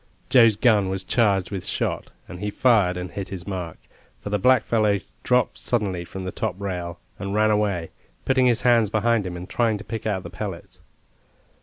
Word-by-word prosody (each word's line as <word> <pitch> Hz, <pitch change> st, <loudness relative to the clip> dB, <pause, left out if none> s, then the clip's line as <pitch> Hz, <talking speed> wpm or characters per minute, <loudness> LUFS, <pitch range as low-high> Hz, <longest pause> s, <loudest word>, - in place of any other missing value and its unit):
Joe's 115 Hz, -4 st, +6 dB
gun 105 Hz, -3 st, +3 dB
was 95 Hz, 0 st, -3 dB
charged 100 Hz, -3 st, +1 dB
with 95 Hz, -3 st, -4 dB
shot, -, -, -2 dB, 0.2 s
and 90 Hz, -, -9 dB
he 105 Hz, -, -2 dB
fired 105 Hz, -6 st, +3 dB
and 90 Hz, 0 st, -5 dB
hit 100 Hz, -2 st, -5 dB
his 95 Hz, -2 st, -7 dB
mark, 90 Hz, -5 st, -5 dB, 0.4 s
for 100 Hz, -, -7 dB
the 105 Hz, -, +1 dB
blackfellow 110 Hz, -3 st, +3 dB, 0.2 s
dropped 125 Hz, 0 st, +1 dB
suddenly 95 Hz, -7 st, -1 dB
from 95 Hz, +2 st, -7 dB
the 95 Hz, -, -4 dB
top 105 Hz, -4 st, -3 dB
rail, 90 Hz, -3 st, -4 dB, 0.2 s
and 100 Hz, +1 st, -3 dB
ran 110 Hz, 0 st, +3 dB
away, 100 Hz, -6 st, 0 dB, 0.3 s
putting 130 Hz, -1 st, +3 dB
his 120 Hz, -2 st, +3 dB
hands 120 Hz, -4 st, +4 dB
behind 110 Hz, -1 st, +1 dB
him, 90 Hz, -1 st, -5 dB
and 90 Hz, +1 st, -8 dB
trying 115 Hz, -2 st, +1 dB
to 100 Hz, -, -9 dB
pick 110 Hz, -1 st, -5 dB
out 95 Hz, -3 st, -1 dB
the 85 Hz, -, -8 dB
pellets. 95 Hz, -2 st, -7 dB
100 Hz, 190 wpm, -24 LUFS, 95-110 Hz, 0.4 s, Joe's